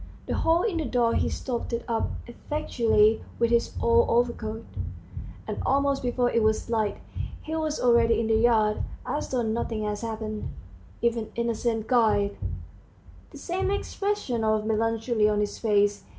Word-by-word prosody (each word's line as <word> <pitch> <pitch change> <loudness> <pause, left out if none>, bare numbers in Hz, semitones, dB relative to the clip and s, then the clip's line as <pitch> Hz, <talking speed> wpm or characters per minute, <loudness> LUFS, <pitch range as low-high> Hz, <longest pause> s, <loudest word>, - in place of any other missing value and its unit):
The - - -2
hole 330 +2 +2
in 410 -7 0
the 320 - -1
door 240 -2 +2
he - - +1
stopped 240 -2 -3
up 230 -1 0 0.2
effectually 235 -5 +1
with 235 0 +2
his 235 0 +1
old 235 0 +4
overcoat, 230 -2 0 0.8
and - - -3
almost 280 0 +2
before 245 0 +1
it 230 - +2
was 220 +1 +1
light 215 -3 0 0.5
he 315 - -4
was 310 -1 -1
already 235 -2 +4
in 230 - 0
the 225 - +1
yard, 220 -2 +3 0.2
as - - -3
though 250 -2 0
nothing 220 0 -2
had 210 -1 -2
happened, 220 -2 -4 0.5
even 230 -2 0
innocent 235 -1 -1
guile! 220 -5 +3 1.0
the - - -12
same 370 +2 -2
expression 400 - -1
of 215 -1 +1
melancholy 225 0 +1
on 210 -1 +1
his 210 0 -2
face. 205 -2 +2
230 Hz, 150 wpm, -26 LUFS, 220-245 Hz, 1.0 s, old